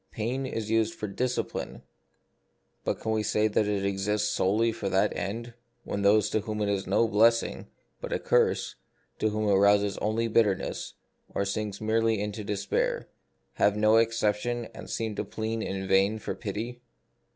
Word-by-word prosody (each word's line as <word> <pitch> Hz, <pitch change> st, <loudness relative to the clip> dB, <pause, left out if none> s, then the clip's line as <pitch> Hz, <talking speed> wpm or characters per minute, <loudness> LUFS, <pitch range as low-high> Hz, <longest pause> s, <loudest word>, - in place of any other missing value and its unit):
Pain 125 Hz, +5 st, -2 dB
is 110 Hz, -4 st, -4 dB
used 115 Hz, -1 st, +2 dB
for -, -, -5 dB
a 100 Hz, -2 st, -7 dB
discipline, 125 Hz, 0 st, -2 dB, 1.0 s
but -, -, -1 dB
can 110 Hz, -, -2 dB
we 110 Hz, 0 st, +1 dB
say 105 Hz, 0 st, +2 dB
that 105 Hz, 0 st, +1 dB
it 100 Hz, -1 st, 0 dB
exists 105 Hz, +2 st, 0 dB
solely 105 Hz, +3 st, +2 dB
for 105 Hz, -3 st, -3 dB
that 95 Hz, 0 st, +2 dB
end 115 Hz, +4 st, -4 dB, 0.3 s
when 100 Hz, -, -3 dB
those 105 Hz, +1 st, +4 dB
to -, -, +2 dB
whom 105 Hz, 0 st, -4 dB
it 105 Hz, -1 st, 0 dB
is 100 Hz, -1 st, -1 dB
no 115 Hz, -, +3 dB
blessing, 115 Hz, +2 st, +2 dB, 0.3 s
but -, -, -6 dB
a -, -, +1 dB
curse, -, -, +1 dB, 0.5 s
whom 110 Hz, 0 st, 0 dB
it 100 Hz, -, +4 dB
rouses 100 Hz, 0 st, +4 dB
only 110 Hz, +2 st, 0 dB
to 115 Hz, -, -4 dB
bitterness, 105 Hz, -4 st, +1 dB, 0.4 s
or 100 Hz, -, +1 dB
sinks 100 Hz, 0 st, -3 dB
merely 110 Hz, 0 st, +1 dB
into 105 Hz, +1 st, -3 dB
despair, 100 Hz, -1 st, -1 dB, 0.4 s
have 105 Hz, 0 st, +2 dB
no 110 Hz, +1 st, +5 dB
exemption, 115 Hz, +1 st, +1 dB
and -, -, -10 dB
seem 110 Hz, -1 st, -2 dB
to -, -, -3 dB
plead 110 Hz, +1 st, -3 dB
in 95 Hz, -2 st, -3 dB
vain 95 Hz, +3 st, +3 dB
for 110 Hz, -, -4 dB
pity? 115 Hz, +4 st, -5 dB
105 Hz, 175 wpm, -28 LUFS, 100-115 Hz, 1.0 s, no